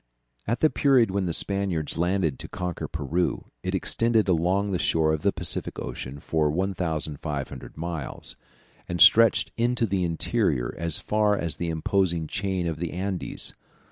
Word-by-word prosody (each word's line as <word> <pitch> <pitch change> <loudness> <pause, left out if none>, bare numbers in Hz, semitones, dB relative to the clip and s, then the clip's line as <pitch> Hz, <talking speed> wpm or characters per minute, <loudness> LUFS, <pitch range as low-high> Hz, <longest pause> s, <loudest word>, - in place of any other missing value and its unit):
At 115 +3 -1
the 155 - +4
period 130 -7 +3
when 95 -1 -1
the - - 0
Spaniards 95 -3 0
landed 85 -4 0
to - - -6
conquer 90 -2 -4
Peru, 80 +3 -2
it - - -2
extended 115 -2 +2
along 95 +3 +1
the 90 - -1
shore 80 -1 +2
of 80 - -2
the - - +2
Pacific - - 0
Ocean 65 +3 -6
for 75 0 0
1500 75 -6 -3
miles, 80 -4 -4 0.5
and 85 0 -3
stretched 115 +6 +6
into 120 0 +1
the 95 -3 -1
interior 80 -7 0
as 85 -2 +2
far 105 -1 +1
as 80 -5 -2
the 85 - -2
imposing 85 +1 0
chain 95 +2 -2
of 80 -2 -3
the 85 -1 -3
Andes. 95 0 -4
85 Hz, 155 wpm, -26 LUFS, 80-100 Hz, 0.5 s, stretched